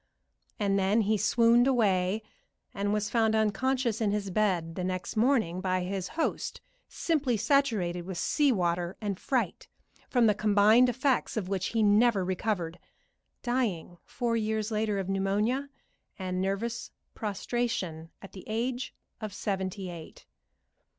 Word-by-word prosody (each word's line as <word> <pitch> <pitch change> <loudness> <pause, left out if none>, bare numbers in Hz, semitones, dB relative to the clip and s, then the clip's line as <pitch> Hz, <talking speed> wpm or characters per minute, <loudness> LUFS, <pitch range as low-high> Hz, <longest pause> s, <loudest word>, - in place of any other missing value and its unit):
And 200 -1 +2
then 200 +4 +3
he 215 +1 +2
swooned 230 +3 +4
away, 205 -5 +2 0.5
and 200 0 -1
was 210 0 -1
found 220 -2 +2
unconscious 230 +2 +1
in 215 - +2
his 200 -1 -2
bed 180 -5 +1
the 180 - -4
next 185 -1 -3
morning 220 -7 +2
by 185 -1 0
his 190 0 -3
host, 325 - -1 0.3
simply 290 -8 0
saturated 210 -9 +1
with 190 -2 -5
sea 285 - +2
water 175 -3 -1
and 200 -3 -3
fright, 240 - -1 0.4
from 245 -3 +3
the 215 - +5
combined 215 +4 +5
effects 255 0 0
of 190 -4 -2
which 190 -2 -1
he 225 -1 +1
never 210 -1 +4
recovered, 180 -2 -2 0.6
dying 215 -9 -1
four 240 -2 -2
years 220 0 -1
later 215 -1 0
of 190 -2 -2
pneumonia 205 +8 0 0.5
and 185 -2 -3
nervous 200 +5 -2 0.2
prostration 200 -6 -3
at 195 - -10
the 190 - -10
age 240 +3 -2 0.2
of 215 -3 -6
seventy 190 -2 -3
eight. 165 -2 -11
210 Hz, 140 wpm, -29 LUFS, 185-235 Hz, 0.6 s, the